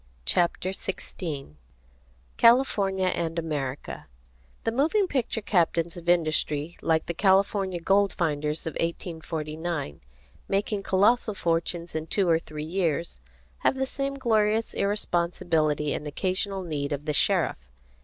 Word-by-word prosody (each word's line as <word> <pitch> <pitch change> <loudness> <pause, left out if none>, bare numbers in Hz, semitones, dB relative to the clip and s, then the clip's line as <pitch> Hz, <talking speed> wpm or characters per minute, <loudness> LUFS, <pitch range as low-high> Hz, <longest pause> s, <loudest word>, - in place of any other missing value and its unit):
CHAPTER 175 - +1
XVI 165 - -5 0.8
CALIFORNIA 200 -6 +4
AND 165 -2 -2
AMERICA 145 -5 -4 0.6
The 225 - +1
moving 310 - +2
picture 240 - -1
captains 170 -3 +1
of 175 -1 -5
industry, 155 -1 +1
like 160 -1 +2
the 170 - -3
California 190 0 +2
gold 195 +3 +3
finders 150 -2 -1
of 160 - -3
1849, 160 - -4 0.5
making 200 +1 0
colossal 210 +3 +3
fortunes 170 0 -1
in 160 0 -3
two 195 +2 +1
or 165 -1 +4
three 150 -2 -7
years, 165 - -1 0.4
have - - +2
the 265 0 0
same 275 +1 -2
glorious 220 -4 +1
irresponsibility 170 -6 0
and 150 - -4
occasional 190 +5 -2
need 150 -4 -3
of 145 0 -3
the 150 - 0
sheriff. 65 - +1
175 Hz, 125 wpm, -27 LUFS, 155-200 Hz, 0.8 s, CALIFORNIA